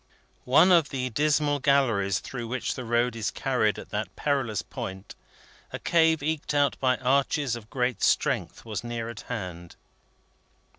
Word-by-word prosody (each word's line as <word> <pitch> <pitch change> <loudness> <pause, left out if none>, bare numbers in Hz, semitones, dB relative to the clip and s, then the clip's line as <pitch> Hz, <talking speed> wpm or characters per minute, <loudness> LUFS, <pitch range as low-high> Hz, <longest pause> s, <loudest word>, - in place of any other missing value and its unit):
One 160 +8 +6
of 165 -4 +5
the 130 -2 -3
dismal 145 +2 +1
galleries 120 -9 +2
through 120 -3 -6
which 130 +3 -2
the 130 - -6
road 120 +1 +1
is 110 -3 -1
carried - - 0
at - - -10
that - - -4
perilous 135 -8 -1
point, 95 +1 -7 0.6
a - - -4
cave 160 -3 +2
eked 155 -1 -2
out 145 -2 +3
by 130 -1 +2
arches 135 0 +1
of 110 -2 -10
great 125 -4 -1
strength, - - 0
was 110 +1 -4
near 120 -1 -4
at 115 -3 -8
hand. 90 -7 -6
125 Hz, 155 wpm, -27 LUFS, 115-145 Hz, 0.6 s, One